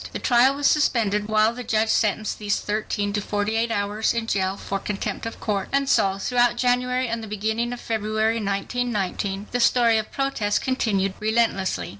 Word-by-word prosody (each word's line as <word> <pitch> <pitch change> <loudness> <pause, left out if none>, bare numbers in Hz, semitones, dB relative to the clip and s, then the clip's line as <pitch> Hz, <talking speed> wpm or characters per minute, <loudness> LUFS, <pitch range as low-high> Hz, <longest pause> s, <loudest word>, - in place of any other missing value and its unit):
The - - -2
trial 255 +2 +3
was 285 0 -3
suspended 215 -9 +2
while 215 +1 +3
the 250 +1 -7
judge 220 -1 +1
sentenced 215 0 0
these 205 -1 0
thirteen 205 -1 -2
to 205 - 0
"forty 205 +2 -2
eight 230 +1 +1
hours 210 +1 0
in 230 -1 -1
jail 195 -3 -1
for 195 0 -4
contempt 205 +2 -4
of 230 - -8
court." 200 -3 -2
And 275 0 +1
so, 195 -6 +2
throughout 240 +3 +2
January 250 +1 +1
and 230 0 -3
the 220 - -7
beginning 220 +3 -2
of 245 - -5
February, 220 0 -1
1919, 200 -2 -2
the 245 - -1
story 235 -2 +4
of 215 - -6
protest 260 -7 -1
continued 200 -7 0
relentlessly. 220 -3 0
220 Hz, 180 wpm, -23 LUFS, 205-240 Hz, -, story